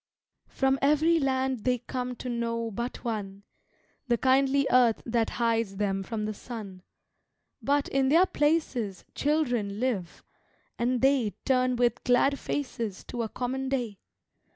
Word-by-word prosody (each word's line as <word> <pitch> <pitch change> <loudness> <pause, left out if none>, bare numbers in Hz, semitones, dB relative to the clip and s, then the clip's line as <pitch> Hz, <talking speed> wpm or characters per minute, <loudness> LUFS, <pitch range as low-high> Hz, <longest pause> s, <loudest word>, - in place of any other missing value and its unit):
From 270 0 +1
every 310 +4 +4
land 265 -2 0
they 250 -1 +2
come 250 +1 -4
to 255 - -7
know 230 -1 -2
but 235 +4 -5
one 200 -4 -4 0.6
The 240 -1 +2
kindly 270 +2 +3
earth 245 -3 +4
that 230 -1 +1
hides 230 -4 +1
them 195 -1 0
from 215 +2 -4
the 215 - -2
sun 205 -4 -8 0.8
But, 285 0 +1
in 265 -1 +1
their 335 +6 +6
places, 295 - 0
children 245 -9 0
live, 220 -9 -2 0.6
and 245 +1 +1
they 265 -6 +3
Turn 255 -1 +2
with 240 -1 +1
glad 265 +3 +3
faces 230 -8 -4
to 240 - -3
a 225 - -2
common 260 +3 -3
day. 240 -7 -2
245 Hz, 140 wpm, -28 LUFS, 225-265 Hz, 0.8 s, their